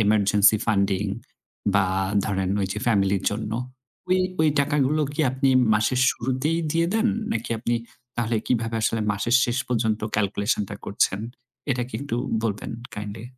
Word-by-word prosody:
emergency 105 0 +4
funding 100 -2 +1 0.7
বা, 100 -1 +4 0.4
ধরেন 95 -3 -1
ওইযে 95 +2 -2
ফ্যামিলির 100 -4 +2
জন্য। 105 +1 -4 0.6
ওই 185 0 +3 0.2
ওই 160 - +4
টাকাগুলো 145 +1 +1
কি 150 - -2
আপনি 130 +1 +1 0.3
মাসের 110 +4 +1
শুরুতেই 130 +7 -1
দিয়ে 165 +2 +2
দেন? 225 +1 +3 0.2
নাকি 115 +1 -3
আপনি 120 +1 -1 0.4
তাহলে 115 -1 0
কিভাবে 115 -2 0
আসলে 115 0 +1
মাসের 115 +5 +2
শেষ 120 +2 -1
পর্যন্ত 110 -3 0
ক্যালকুলেশনটা 100 0 0
করছেন? 100 -1 +1 0.5
এটা 125 -2 0
কি - - -13
একটু 140 -4 -3 0.3
বলবেন 105 -3 -2 0.2
কাইন্ডলি? 105 +2 -6
110 Hz, 140 wpm, -24 LUFS, 100-130 Hz, 0.7 s, emergency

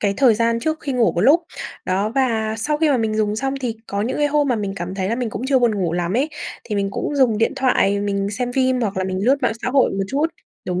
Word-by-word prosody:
cái 200 -1 +1
thời 250 -5 +5
gian 230 +1 +1
trước 315 +5 -2
khi 280 - -3
ngủ 245 -3 +2
một 170 - -1
lúc, 290 - +5 0.4
đó, 195 +3 0
và 225 -5 +1
sau 295 +7 +1
khi 315 - +3
mà 265 - +3
mình 220 -2 -1
dùng 210 -1 0
xong 270 +3 -1
thì 235 -3 -3
có 200 0 -2
những 235 - -2
cái 295 - +2
hôm 290 0 +1
mà 245 - +2
mình 200 -2 -3
cảm 180 0 -5
thấy 190 -1 -2
là 225 - 0
mình 240 -2 -3
cũng - - -5
chưa 270 -1 +3
buồn 240 -3 +2
ngủ 175 -3 0
lắm 175 +1 -1
ấy, 280 +5 +1 0.4
thì 215 - -4
mình 200 -1 0
cũng 290 - -3
dùng 245 -6 +3
điện 225 - +2
thoại 205 -6 +2
mình 200 -1 -1
xem 245 +3 -2
phim 260 -1 +1
hoặc 205 -5 -2
là 185 - 0
mình 185 +1 -2
lướt 265 +3 +4
mạng 245 - +2
xã - - -1
hội 265 -1 +3
một 195 0 -2
chút. 285 +4 +1 0.4
Đúng 180 0 -1
230 Hz, 290 wpm, -20 LUFS, 200-260 Hz, 0.4 s, thời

